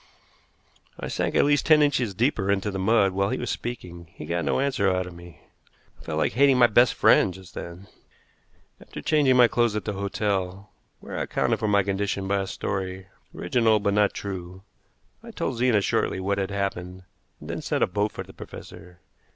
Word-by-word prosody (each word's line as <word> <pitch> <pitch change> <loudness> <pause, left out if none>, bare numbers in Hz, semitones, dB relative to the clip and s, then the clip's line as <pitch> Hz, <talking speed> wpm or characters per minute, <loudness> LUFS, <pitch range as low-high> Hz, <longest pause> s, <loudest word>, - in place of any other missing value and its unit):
I - - -5
sank - - -2
at - - +4
least 145 0 +2
ten 155 -1 +6
inches 125 -8 0
deeper 110 -3 0
into 100 +1 0
the 95 - -4
mud 100 0 +3
while 100 +1 0
he 130 - -1
was 125 - -3
speaking. 90 -8 -6
He - - -8
got 85 +2 -2
no 70 - 0
answer 130 -8 +1
out 90 0 0
of 90 - -9
me. 85 -1 -14 0.6
I - - -15
felt 80 -2 -3
like - - +1
hating 135 +1 +4
my 125 - +7
best 120 +2 +4
friend 100 - +4
just 95 0 -13
then. 85 +3 -8 1.0
After - - -10
changing 145 -5 +3
my 120 -1 +7
clothes 120 -2 +1
at 105 - -3
the 105 - -2
hotel, 100 -1 -3 0.3
where - - -6
I - - -1
accounted - - 0
for 110 - -1
my 100 -1 +3
condition 100 0 -2
by 100 0 +1
a 95 - -4
story, 95 0 -4 0.3
original 110 +3 +2
but 100 0 0
not 105 -1 +3
true, 95 -1 -7 0.6
I - - -12
told 125 - -3
Zena 120 -4 +3
shortly 95 - 0
what 100 +1 -1
had 95 - -2
happened, 95 -2 -4 0.4
then - - -6
sent - - 0
a - - +3
boat 105 +3 -1
for - - -6
the - - -15
professor. 90 0 -12
100 Hz, 200 wpm, -25 LUFS, 95-115 Hz, 1.0 s, my